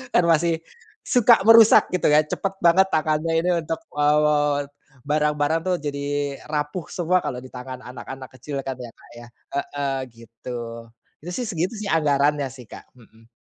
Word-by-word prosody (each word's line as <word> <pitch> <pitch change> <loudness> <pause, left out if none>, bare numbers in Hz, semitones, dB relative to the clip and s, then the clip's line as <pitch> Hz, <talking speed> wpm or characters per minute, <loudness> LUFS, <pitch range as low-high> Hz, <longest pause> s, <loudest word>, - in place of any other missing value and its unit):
Kan 180 - +5
masih, 165 0 +3 0.5
suka 240 -2 +5
merusak 225 -1 +8
gitu 155 - +2
ya, 150 - +6
cepet 195 +4 -2
banget 175 +2 +5
tangannya 155 +1 0
ini 180 +2 0
untuk, 165 +4 -3 0.2
eee, 150 -1 +2 0.5
barang-barang 150 +1 +1
tuh 185 -1 0
jadi 145 -1 -3 0.2
rapuh 150 +3 -2
semua 180 +1 0
kalau 125 - -4
ditangan 130 0 -9
anak-anak 130 +1 -9
kecil 135 +2 -6
kan 130 - -3
ya 120 -2 -9
Kak - - -21
ya. 120 0 -11 0.3
Heeh, 140 -1 -2
gitu. 115 +1 -9 0.6
Itu 175 - -6
sih 240 +5 -3
segitu 180 +2 -2
anggarannya 145 -3 +2
sih 125 -4 -13
Kak, - - -13
hmm. 115 -1 -22
150 Hz, 150 wpm, -23 LUFS, 135-165 Hz, 0.6 s, merusak